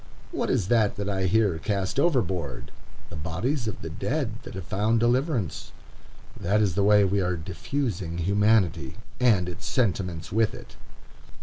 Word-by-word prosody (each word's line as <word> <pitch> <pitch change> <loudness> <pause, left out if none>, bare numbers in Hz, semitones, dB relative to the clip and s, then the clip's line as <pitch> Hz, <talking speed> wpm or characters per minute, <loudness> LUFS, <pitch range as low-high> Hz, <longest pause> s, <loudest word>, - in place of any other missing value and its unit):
What - - -2
is 95 - +1
that 110 -4 +3
that 100 -1 -4
I 95 -2 0
hear 95 -3 +2
cast 100 +5 -1
overboard? 95 - 0 0.4
The - - -6
bodies 100 - -2
of 105 - -5
the 80 - -4
dead 125 - -2
that - - -10
have 95 - -5
found 105 +6 +1
deliverance. 120 - 0 0.7
That 100 +4 +1
is 100 -4 +2
the 100 +3 +1
way 105 0 +6
we 100 +1 +1
are 90 -1 0
"diffusing" 95 - -3
humanity, 95 -5 +2 0.2
and 110 -8 +3
its 90 - -6
sentiments 90 -8 -1
with 110 +2 +2
it. - - -12
100 Hz, 160 wpm, -26 LUFS, 90-115 Hz, 0.7 s, way